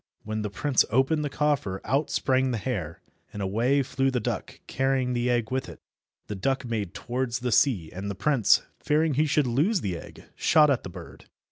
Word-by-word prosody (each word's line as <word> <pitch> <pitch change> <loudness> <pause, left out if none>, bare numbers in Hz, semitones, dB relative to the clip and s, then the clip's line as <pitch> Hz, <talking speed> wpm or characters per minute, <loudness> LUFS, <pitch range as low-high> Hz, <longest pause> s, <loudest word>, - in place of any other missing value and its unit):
When 110 0 -3
the 105 - -3
prince 130 +7 +2
opened 135 +7 +2
the 145 - -2
coffer 140 -10 0
out 140 +7 0
sprang 130 0 +1
the 120 - -1
hare, 95 - -4 0.3
and 105 - -7
away 115 +8 +1
flew 135 +1 0
the 130 -2 0
duck 110 - -4
carrying 130 -1 0
the 120 0 0
egg 120 -2 0
with 130 0 -2
it. - - -11 0.5
The - - -5
duck 130 +7 -1
made 105 -5 -3
towards 125 +2 -3
the 125 -1 -1
sea, 105 - +2
and 95 +3 -5
the 100 - -4
prince, 130 +1 +3 0.2
fearing 155 +1 +1
he 155 +4 +2
should 145 0 +2
lose 155 - +1
the 95 -3 -2
egg, - - -12
shot 150 -2 +4
at 130 - +1
the - - -8
bird. 85 - -11
125 Hz, 205 wpm, -26 LUFS, 105-140 Hz, 0.5 s, shot